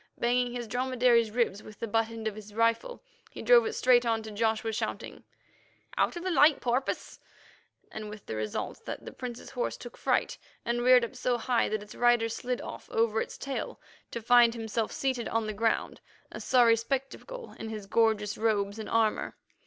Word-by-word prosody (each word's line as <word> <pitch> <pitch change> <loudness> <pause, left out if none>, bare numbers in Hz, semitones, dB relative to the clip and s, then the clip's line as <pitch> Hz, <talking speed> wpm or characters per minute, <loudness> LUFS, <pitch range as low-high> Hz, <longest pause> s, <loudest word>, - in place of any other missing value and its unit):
Banging 245 +1 +1
his 240 -1 -5
dromedary's 245 -1 +2
ribs 215 -3 0
with 215 - -13
the 230 - -3
butt 225 +1 +1
end 225 -1 -5
of 215 - -2
his 210 0 -11
rifle, 230 - 0 0.3
he - - -9
drove 480 -2 +6
it 445 - -3
straight 250 - +4
on 225 -2 0
to 220 - -8
Joshua, 220 +1 0
shouting: 220 0 -4 0.7
"Out - - +1
of 345 - -6
the 370 - -1
light, 295 -1 +5
porpoise!" 250 +2 -2 0.7
with 210 -1 -7
the 110 - -5
result 110 -1 -4
that - - -6
the - - -7
Prince's 245 -2 -7
horse 245 - -2
took 240 - -10
fright, - - 0 0.3
and 240 +1 0
reared 250 -1 +6
up 245 - -11
so 250 -1 0
high 240 0 +1
that 215 -1 -2
its 210 - -12
rider 240 -1 +3
slid 245 +2 -3
off - - -9
over 225 -1 +1
its - - -6
tail 275 -1 -5 0.3
to 235 - -6
find 240 0 +6
himself 225 -1 -2
seated 260 -3 -2
on 225 -1 0
the 215 - -3
ground, 225 +2 -1 0.3
a - - -7
sorry 240 -3 +5
spectacle 270 - -4
in 225 - -5
his 215 -2 -6
gorgeous 215 0 +1
robes 210 -1 0
and 220 - -6
armour. 225 -1 +1
230 Hz, 190 wpm, -29 LUFS, 220-250 Hz, 0.7 s, drove